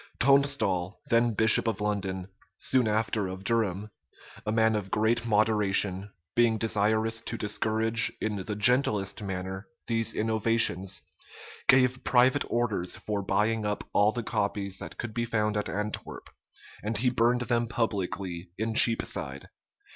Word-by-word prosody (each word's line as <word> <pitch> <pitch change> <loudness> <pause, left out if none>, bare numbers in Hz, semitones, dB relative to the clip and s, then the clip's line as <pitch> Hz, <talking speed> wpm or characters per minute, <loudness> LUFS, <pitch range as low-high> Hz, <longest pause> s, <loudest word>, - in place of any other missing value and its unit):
Tonstal, 135 -9 +2
then 115 -1 +3
bishop 110 +2 +4
of 110 -4 -1
London, 95 -3 -3 0.3
soon 130 -3 +1
after 110 -1 0
of 95 +1 -7
Durham, 105 -2 -1 0.6
a - - +1
man 110 0 +2
of 100 -2 -3
great 115 +3 +1
moderation, 105 -2 +1 0.2
being 120 -2 +3
desirous 110 +1 +1
to 115 - -5
discourage, 110 +1 0
in 105 -1 -2
the 100 +2 -4
gentlest 105 -3 +2
manner, 95 0 -5 0.2
these 115 -1 0
innovations, 110 -4 +1 0.6
gave 130 0 +4
private 130 +3 +3
orders 110 -7 -1
for 105 -1 -3
buying 105 +3 0
up 105 0 -2
all 105 +1 +4
the 120 +1 -4
copies 100 -2 -2
that - - -8
could 120 -2 -6
be 120 - -1
found 105 -2 -1
at 105 - -2
Antwerp; 105 +2 -5 0.5
and 105 +1 -2
he 125 +3 +2
burned 120 0 +2
them 120 -1 0
publicly 95 -6 -3
in 110 +2 -2
Cheapside. 110 - +1
110 Hz, 140 wpm, -28 LUFS, 100-115 Hz, 0.6 s, bishop